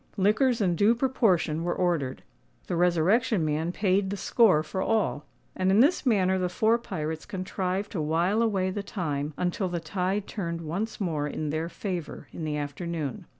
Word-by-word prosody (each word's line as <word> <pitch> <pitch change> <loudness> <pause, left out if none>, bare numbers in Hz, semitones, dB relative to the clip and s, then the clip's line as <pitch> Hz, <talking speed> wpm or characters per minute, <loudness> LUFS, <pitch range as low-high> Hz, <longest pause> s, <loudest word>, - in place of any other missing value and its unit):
Liquors 220 +5 +3
in 180 -4 +2
due 210 +7 +4
proportion 195 - +1
were 175 - -1
ordered; 165 -8 -1 0.4
the 175 - -2
Resurrection 180 +3 +2
Man 155 +3 -1
paid 190 0 +1
the 200 - -3
score 190 -8 +4
for 160 +5 -4
all; 170 - 0 0.3
and 185 0 +1
in 195 +3 +4
this 285 +2 +3
manner 190 -5 +3
the 180 -1 0
four 220 +6 +2
pirates 160 -7 -4
contrived 190 0 -3
to 175 - -2
while 170 +8 +1
away 195 -5 +1
the 205 - -3
time 150 -7 -3
until 180 +1 -1
the 175 -1 -2
tide 185 +4 -2
turned 170 -5 -4
once 180 +8 -4
more 160 -7 -1
in 150 0 -3
their 160 +2 -2
favour 180 -4 -5
in 160 - -5
the 150 -1 -2
afternoon. 150 0 -4
180 Hz, 175 wpm, -27 LUFS, 160-205 Hz, 0.4 s, due